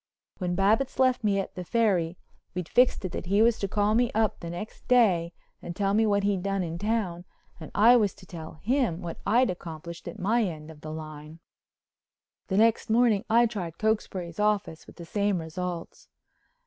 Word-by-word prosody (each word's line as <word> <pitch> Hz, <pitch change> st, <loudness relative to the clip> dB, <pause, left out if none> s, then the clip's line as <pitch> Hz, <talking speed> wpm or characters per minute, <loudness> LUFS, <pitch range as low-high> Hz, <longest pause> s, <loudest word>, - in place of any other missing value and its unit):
When 180 Hz, -2 st, -1 dB
Babbitts 220 Hz, +8 st, +2 dB
left 255 Hz, -2 st, +2 dB
me 200 Hz, -2 st, +2 dB
at 195 Hz, -, -4 dB
the 180 Hz, -, -6 dB
Ferry 180 Hz, -5 st, +1 dB, 0.4 s
we'd 180 Hz, -2 st, -3 dB
fixed 245 Hz, -4 st, +3 dB
it 185 Hz, -, -3 dB
that 175 Hz, -, -5 dB
he 200 Hz, +4 st, +4 dB
was 235 Hz, -1 st, +3 dB
to 200 Hz, -, -1 dB
call 205 Hz, +1 st, +1 dB
me 240 Hz, +1 st, +2 dB
up 220 Hz, -2 st, +1 dB
the 170 Hz, -, -7 dB
next 175 Hz, +6 st, -8 dB
day 190 Hz, -9 st, +4 dB, 0.3 s
and 170 Hz, -, -7 dB
tell 200 Hz, 0 st, 0 dB
me 220 Hz, +1 st, +3 dB
what 200 Hz, -1 st, +2 dB
he'd 200 Hz, -2 st, +1 dB
done 195 Hz, 0 st, -1 dB
in 165 Hz, 0 st, -5 dB
town 205 Hz, -5 st, -1 dB, 0.4 s
and 155 Hz, -, -9 dB
I 235 Hz, +4 st, +7 dB
was 210 Hz, -4 st, +1 dB
to 185 Hz, -, -15 dB
tell 165 Hz, -3 st, -9 dB
him 230 Hz, -8 st, 0 dB
what 170 Hz, -1 st, -6 dB
I'd 240 Hz, +3 st, +4 dB
accomplished 170 Hz, -1 st, -8 dB
at -, -, -7 dB
my 225 Hz, +6 st, +1 dB
end 160 Hz, -5 st, -5 dB
of 150 Hz, -2 st, -15 dB
the 155 Hz, -, -7 dB
line. 155 Hz, 0 st, -8 dB, 1.1 s
The 190 Hz, -, -1 dB
next 225 Hz, +1 st, +3 dB
morning 225 Hz, -2 st, +3 dB
I 235 Hz, +2 st, +5 dB
tried 190 Hz, -8 st, -4 dB
Cokesbury's 195 Hz, -6 st, -2 dB
office 210 Hz, -6 st, 0 dB
with -, -, -14 dB
the 170 Hz, -, -10 dB
same 200 Hz, +1 st, 0 dB
results. 170 Hz, +1 st, -6 dB
195 Hz, 195 wpm, -27 LUFS, 170-220 Hz, 1.1 s, I